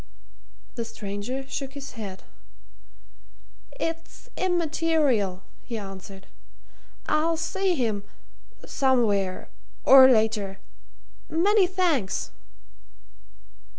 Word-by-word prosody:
The 235 - -3
stranger 225 +4 -5
shook 275 -1 -5
his 280 -1 -8
head. 205 -6 -8 1.6
"It's 330 0 -5
immaterial," 315 - +1 0.2
he 235 - -6
answered. 195 -1 -9 0.8
"I'll 320 +2 +1
see 360 +3 0
him 225 -7 -1 0.6
somewhere 215 -8 +1 0.4
or 265 -1 +9
later. 215 -4 +1 0.7
Many 380 +4 +3
thanks." 345 - 0
260 Hz, 75 wpm, -25 LUFS, 205-325 Hz, 1.6 s, or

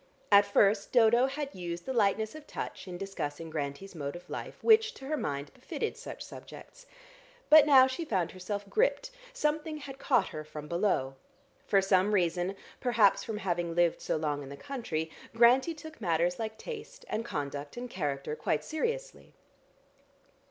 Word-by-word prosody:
At 200 0 +7
first 200 0 +3
Dodo 240 +1 +5
had 280 +1 -4
used 175 -1 -5
the 265 - -2
lightness 220 -1 +2
of 310 -1 -11
touch, - - -6
in 180 -1 -6
discussing 165 -5 -5
Grantie's 150 +5 -4
mode 145 -3 -5
of 175 - -10
life, - - -6
which, 445 0 +5
to 270 - -10
her 305 +3 -1
mind, 140 - -4
befitted 440 - -4
such - - -8
subjects. - - -12 0.6
But 305 -1 +9
now 265 -3 +8
she 260 +6 -3
found 190 - -1
herself 200 +2 -5
gripped; - - +1 0.2
something 310 -8 -1
had 275 -2 -9
caught 250 -8 +2
her 155 - -6
from 150 0 -9
below. 170 -7 0 0.5
For 195 -1 +4
some 195 +2 +3
reason 180 +1 +1 0.2
perhaps 225 -5 +3
from 220 - -4
having 175 -3 -2
lived 175 -1 +2
so - - -1
long 150 -2 -1
in 135 - -8
the 140 - -8
country 175 - -4 0.2
Grantie 250 +7 +5
took 310 -3 -11
matters 175 -1 +1
like 220 -1 -4
tastes 480 - -8
and 225 - -2
conduct 145 -3 -5
and 245 +1 -4
character 150 - -3
quite 155 - -1
seriously. 475 +10 -4
200 Hz, 165 wpm, -30 LUFS, 170-275 Hz, 0.6 s, But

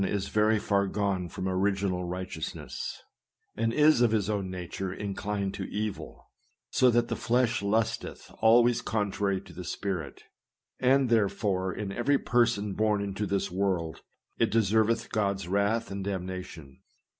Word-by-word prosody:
is 100 0 -1
very 110 +1 +3
far 100 -1 +1
gone 95 -3 -1
from 95 +2 -4
original 95 -1 0
righteousness, 90 -2 -5 0.5
and 115 0 0
is 150 0 +5
of 120 - +5
his 105 -2 +1
own 100 -3 -2
nature 90 +1 -5
inclined 100 0 -3
to - - -5
evil, 105 0 -5 0.4
so 130 - +5
that 120 0 +2
the - - -2
flesh 120 -1 +1
lusteth 110 +3 -1
always 120 +1 +5
contrary 100 -2 -1
to - - -14
the 90 - -7
spirit; 90 -4 -4 0.6
and, 130 0 +3
therefore, 100 -4 +1
in 100 +2 -4
every 140 +7 +2
person 120 -6 +1
born 105 0 +1
into 100 +1 -3
this 100 -2 -1
world, 90 -4 -1 0.4
it 115 - +3
deserveth 110 +1 +2
God's 100 -4 0
wrath 100 +4 0
and 100 0 -4
damnation. 90 -7 -6
100 Hz, 145 wpm, -28 LUFS, 95-110 Hz, 0.6 s, is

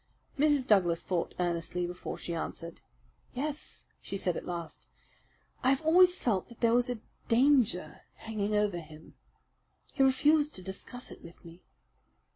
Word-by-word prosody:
Mrs. 290 -2 +3
Douglas 180 -7 +3
thought 180 -3 -2
earnestly 175 0 -1
before 180 +1 -6
she 170 - -5
answered. 165 0 -6 0.5
"Yes," 295 +3 -5 0.2
she 200 - -5
said 180 -3 -1
at - - -6
last, 170 -2 -6 0.7
"I 255 - +3
have 270 +3 +2
always 360 +3 +6
felt 210 - -1
that 235 - -14
there 230 -1 +3
was 245 +1 +2
a 240 -3 -4 0.3
danger 230 - +3
hanging 210 -1 -3
over 205 -4 +1
him. 155 -1 -13 0.8
He - - -1
refused 295 +3 +4
to 185 - -2
discuss 220 +6 -7
it - - -12
with 170 0 -14
me. 170 +2 -13
210 Hz, 150 wpm, -30 LUFS, 175-265 Hz, 0.8 s, always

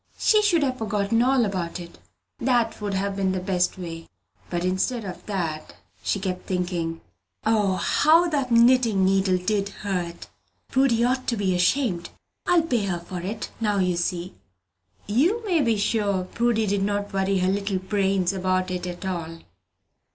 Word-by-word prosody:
She 430 -1 +4
should 355 -7 +3
have 255 -2 -1
forgotten 215 +1 0
all 255 -1 +3
about 185 -3 -3
it: 170 -1 -11 0.4
that 240 -3 +1
would 205 -1 -2
have 195 +1 -1
been 190 -1 0
the 185 - -1
best 180 -1 0
way. 165 -2 -7 0.4
But 175 0 -2
instead 205 +5 -1
of 185 -2 -7
that, 165 -7 -3 0.3
she 200 - -1
kept 185 -1 -4
thinking, 175 -3 -2 0.4
"O, 210 -4 +2
how 320 - +4
that 280 -5 -1
knitting 235 -4 +5
needle 190 -1 +3
did 200 +2 -1
hurt! 180 -4 -4 0.4
Prudy 260 -3 +3
ought 255 +1 0
to 235 - 0
be 195 -2 +1
ashamed! 180 0 +1 0.4
I'll 350 -2 +4
pay 240 -10 0
her 175 -2 -2
for 180 +1 -6
it, 210 +4 -5
now 210 -2 +1
you 180 -2 +1
see!" 175 +1 -2 0.7
You 340 - +1
may 350 -6 +2
be 230 -5 +2
sure 205 -2 0
Prudy 225 +3 0
did 200 -1 0
not 205 0 -1
worry 195 0 +1
her 185 0 +2
little 200 0 -1
brains 190 -1 0
about 185 -1 0
it 180 0 -3
at 175 +1 -6
all. 165 -3 -4
195 Hz, 165 wpm, -24 LUFS, 185-230 Hz, 0.7 s, knitting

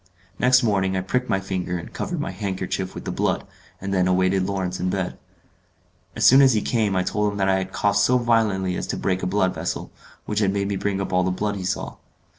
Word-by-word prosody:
Next 125 +1 +5
morning 95 -4 +1
I - - 0
pricked 125 +7 -1
my 95 - +2
finger 95 -2 -3
and 85 - -9
covered 175 -4 -3
my 160 +4 -3
handkerchief 95 -2 -3
with - - -7
the - - -2
blood, - - -1 0.3
and 95 +1 -4
then 90 -1 +2
awaited 95 +1 +2
Lawrence 95 -2 -2
in 90 - 0
bed. 95 -1 -2 1.0
As - - +1
soon 135 +2 +8
as 135 -2 +6
he 105 - +1
came 110 -5 +1
I 90 - +2
told 105 +2 0
him 100 - -6
that 95 -1 +1
I 95 0 +3
had 95 0 -5
coughed 100 +1 +1
so 125 +5 +4
violently 110 -6 +1
as - - -4
to - - -3
break 95 -1 -1
a - - -1
blood 95 -1 +1
vessel, - - -4 0.3
which 105 0 -1
had 100 -3 +2
made 100 0 -1
me 100 - -1
bring 100 0 -1
up 95 - -3
all 90 - +4
the 95 - +1
blood 100 +3 -1
he 95 - -5
saw. - - -3
95 Hz, 240 wpm, -23 LUFS, 95-105 Hz, 1.0 s, soon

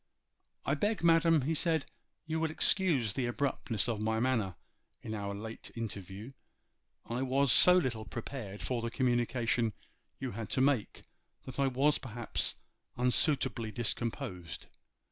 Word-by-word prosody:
'I 140 - +2
beg, 205 +6 0
madam,' 165 -2 +5
he 155 +5 0
said, 160 0 +1 0.4
'you 160 0 -1
will 160 0 +1
excuse 155 - +3
the 125 +1 -1
abruptness 120 -4 0
of 115 -3 -1
my 110 +1 +1
manner 115 -7 +1 0.5
in 110 - -5
our 100 -1 -3
late 110 +2 -7
interview. 105 0 -6 0.7
I 120 +2 -3
was 135 0 +2
so 180 +8 +7
little 120 -10 -1
prepared 110 -2 -6
for 125 -2 -1
the 115 - -2
communication 120 -2 +1 0.5
you 130 -2 -3
had 110 -2 -6
to - - +4
make 135 -6 +1 0.4
that 130 +1 -8
I 140 - +3
was 135 +3 +2
perhaps 120 -2 -2 0.4
unsuitably 125 - +2
discomposed. 105 -6 -3
125 Hz, 140 wpm, -32 LUFS, 110-140 Hz, 0.7 s, so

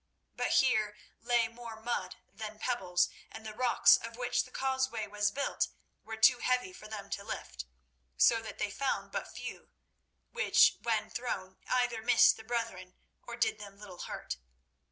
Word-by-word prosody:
But - - 0
here 215 -5 +3 0.2
lay 240 -2 +2
more 230 -1 -9
mud 220 -5 -3 0.2
than 215 -1 -7
pebbles, 190 -7 +1 0.2
and 220 0 -10
the 215 - -6
rocks 245 +2 +5
of 230 0 -8
which 245 0 0
the - - -14
causeway 265 -4 -1
was 205 0 0
built 280 +6 -1 0.4
were 225 0 -6
too 240 +3 +6
heavy 250 -8 0
for 215 - -11
them 205 -2 -7
to 200 - -3
lift, 60 - -6 0.5
so 225 - +5
that 220 - -8
they 205 - -2
found 270 +7 -2
but - - -3
few, - - -8 0.6
which 485 - +5
when 220 -2 0
thrown 190 -6 -4
either 245 -3 +1
missed 245 +2 +6
the 220 - -11
brethren 220 -6 -4 0.3
or 235 - -7
did 235 -1 +1
them 200 -1 -10
little 195 -4 -11
hurt. 65 - -5
220 Hz, 165 wpm, -32 LUFS, 205-245 Hz, 0.6 s, too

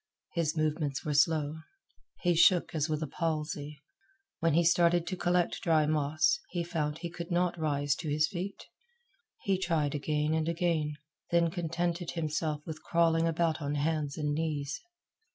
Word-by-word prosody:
His 165 -2 0
movements 155 -2 -1
were 150 - 0
slow. 150 +1 +2 0.6
He 175 -2 +3
shook 170 +1 +4
as 155 0 0
with 155 0 -1
a - - -3
palsy. 150 -1 -3 0.6
When 165 -2 +2
he 170 - +4
started 170 0 +4
to 185 - -3
collect 175 -1 +1
dry 160 -3 +3
moss, 155 - +2
he 175 -1 -2
found 155 -3 -2
he 170 +1 -5
could 170 -1 -7
not 175 0 +1
rise 145 -2 +1
to 160 - -4
his 150 +1 +2
feet. 195 +1 -5 0.8
He 195 -2 +1
tried 160 -6 0
again 150 +1 0
and 160 0 0
again, 165 -3 0 0.4
then 170 -1 +3
contented 175 0 -2
himself 155 -2 -2
with 155 -1 -7
crawling 165 -1 +2
about 165 -1 0
on 145 0 -2
hands 150 -1 -1
and 150 -1 -1
knees. 145 -2 -2
160 Hz, 160 wpm, -30 LUFS, 150-170 Hz, 0.8 s, shook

